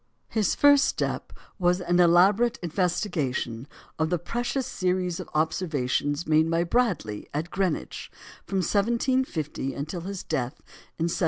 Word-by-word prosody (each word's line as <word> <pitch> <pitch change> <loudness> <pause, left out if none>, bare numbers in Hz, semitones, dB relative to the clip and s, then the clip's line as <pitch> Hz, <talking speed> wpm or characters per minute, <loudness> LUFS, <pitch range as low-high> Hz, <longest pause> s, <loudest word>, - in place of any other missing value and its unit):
His 215 -3 +1
first 285 -1 +6
step - - -2 0.3
was 180 0 +3
an 175 0 +1
elaborate 195 +7 +5
investigation 155 - -1 0.3
of 160 0 +1
the 175 - +1
precious 240 - -2
series 180 -5 -1
of 185 - -7
observations 150 -2 0
made 155 +1 +3
by 165 +1 +2
Bradley 175 - -1
at 160 +4 -2
Greenwich 190 -5 -2 0.3
from 195 -1 -1
1750 205 - 0
until 155 +5 -4
his 190 +1 -5
death 125 +3 -2 0.4
in 165 - -1
1762. 170 - -1
175 Hz, 135 wpm, -26 LUFS, 155-200 Hz, 0.4 s, first